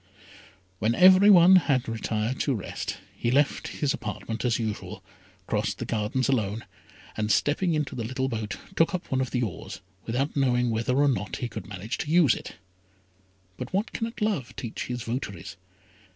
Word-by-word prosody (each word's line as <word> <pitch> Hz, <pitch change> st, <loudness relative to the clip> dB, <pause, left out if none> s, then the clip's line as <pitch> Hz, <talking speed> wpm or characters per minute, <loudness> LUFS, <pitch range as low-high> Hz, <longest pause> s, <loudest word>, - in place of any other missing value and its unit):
When 110 Hz, +3 st, +1 dB
every 185 Hz, +2 st, +7 dB
one 185 Hz, -1 st, +8 dB
had 135 Hz, -8 st, +1 dB
retired 115 Hz, +1 st, -2 dB
to 140 Hz, -, +1 dB
rest, 100 Hz, -, -5 dB, 0.2 s
he 120 Hz, -, -1 dB
left 140 Hz, +3 st, +2 dB
his 145 Hz, -2 st, -1 dB
apartment 110 Hz, +2 st, -5 dB
as 120 Hz, -2 st, +2 dB
usual, 110 Hz, -3 st, -5 dB, 0.4 s
crossed -, -, -1 dB
the -, -, -4 dB
gardens 115 Hz, +4 st, -1 dB
alone, 110 Hz, -5 st, 0 dB, 0.5 s
and 105 Hz, 0 st, -1 dB
stepping 160 Hz, -, +2 dB
into 150 Hz, -2 st, -2 dB
the 120 Hz, -, -4 dB
little 130 Hz, +3 st, -2 dB
boat, 110 Hz, -4 st, -4 dB, 0.2 s
took 165 Hz, +3 st, +3 dB
up 180 Hz, -, -6 dB
one 130 Hz, 0 st, +2 dB
of 130 Hz, -, -2 dB
the 125 Hz, +1 st, 0 dB
oars 100 Hz, -8 st, -6 dB, 0.3 s
without 130 Hz, +6 st, -1 dB
knowing 125 Hz, -3 st, +2 dB
whether 115 Hz, +3 st, 0 dB
or 145 Hz, +1 st, +4 dB
not 110 Hz, -7 st, -1 dB
he 120 Hz, -, -3 dB
could 115 Hz, -, -8 dB
manage 105 Hz, +2 st, -5 dB
to 150 Hz, -, -3 dB
use 160 Hz, -6 st, +5 dB
it: -, -, -7 dB, 1.0 s
but 125 Hz, -, -6 dB
what 205 Hz, +4 st, 0 dB
cannot 230 Hz, 0 st, -4 dB
love 155 Hz, -, -1 dB
teach 115 Hz, -3 st, -5 dB
his 125 Hz, -2 st, -4 dB
votaries? 100 Hz, -8 st, -5 dB
125 Hz, 175 wpm, -26 LUFS, 110-145 Hz, 1.0 s, one